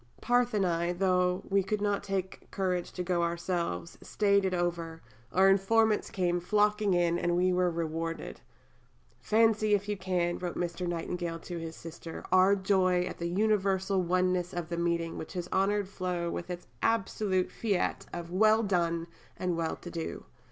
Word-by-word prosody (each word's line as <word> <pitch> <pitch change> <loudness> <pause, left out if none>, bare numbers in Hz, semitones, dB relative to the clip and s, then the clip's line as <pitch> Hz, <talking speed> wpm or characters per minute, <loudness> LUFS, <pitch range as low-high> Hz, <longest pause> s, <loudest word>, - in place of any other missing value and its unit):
Parthe 245 -1 +2
and 200 -2 +2
I, 170 0 0
though 180 0 +1
we 195 0 +3
could 205 +3 -2
not 205 -1 0
take 190 -1 -4
courage 180 -3 -1
to 180 - -3
go 175 -1 0
ourselves, 170 - -2
staid 200 -2 +2
it 190 - 0
over; 170 -2 -2 0.3
our 190 +1 +5
informants 210 +3 +3
came 175 -2 0
flocking 210 +1 +2
in, 175 -1 +2
and 175 0 +1
we 180 +1 +3
were 180 0 +2
rewarded." 165 0 -4 0.8
"Fancy 215 -1 +3
if 200 0 -3
you 210 - -1
can," 180 -2 -1
wrote 180 -1 -4
Mr. 175 +1 -3
Nightingale 170 0 -3
to 175 -2 -6
his 165 0 -6
sister, 165 0 -9
"our 185 +2 +6
joy 190 -2 +2
at 180 - -6
the 170 - -2
universal 195 -1 +1
oneness 180 0 0
of 175 -2 -4
the 170 - -2
meeting 170 -1 -1
which 160 - -7
has 180 -2 -4
honoured 200 +1 +1
Flo 180 -3 -3
with 175 - -5
its 175 0 -6 0.2
absolute 195 -4 0
fiat 200 -5 -1
of 170 0 -6
'Well 215 +4 +4
done' 170 -4 0 0.3
and 180 -2 -1
well 165 -1 -1
to 175 - -10
do. 165 -2 -5
180 Hz, 170 wpm, -30 LUFS, 170-195 Hz, 0.8 s, our